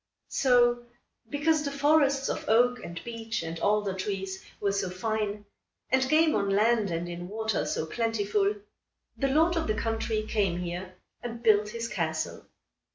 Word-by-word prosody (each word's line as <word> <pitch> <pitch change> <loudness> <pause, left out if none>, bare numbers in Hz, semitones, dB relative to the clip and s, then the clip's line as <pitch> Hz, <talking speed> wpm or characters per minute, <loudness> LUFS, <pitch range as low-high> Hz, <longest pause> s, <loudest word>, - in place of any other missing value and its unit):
So, 240 -2 +3 0.5
because 305 +2 +2
the 290 - -2
forests 280 -1 +3
of - - -3
oak, 245 +2 +3
and 170 0 -6
beech, 230 -4 -4
and 165 0 -5
alder 205 0 +1
trees 190 0 -4 0.2
were 200 - +1
so 195 -2 -1
fine, 210 +2 -2 0.5
and 260 0 +3
game 315 0 +4
on 200 -1 +1
land 215 +1 +3
and 170 +1 -2
in 175 0 -6
water 220 -7 -1
so 155 - -1
plentiful, 210 0 0 0.6
the 275 - 0
lord 320 +5 +3
of 330 - -1
the 215 - +1
country 225 -1 -1
came 200 -5 0
here 180 +1 -5 0.3
and 235 -1 -6
built 210 -2 +4
his 230 +1 -4
castle. 165 -7 -3
215 Hz, 160 wpm, -28 LUFS, 195-245 Hz, 0.6 s, game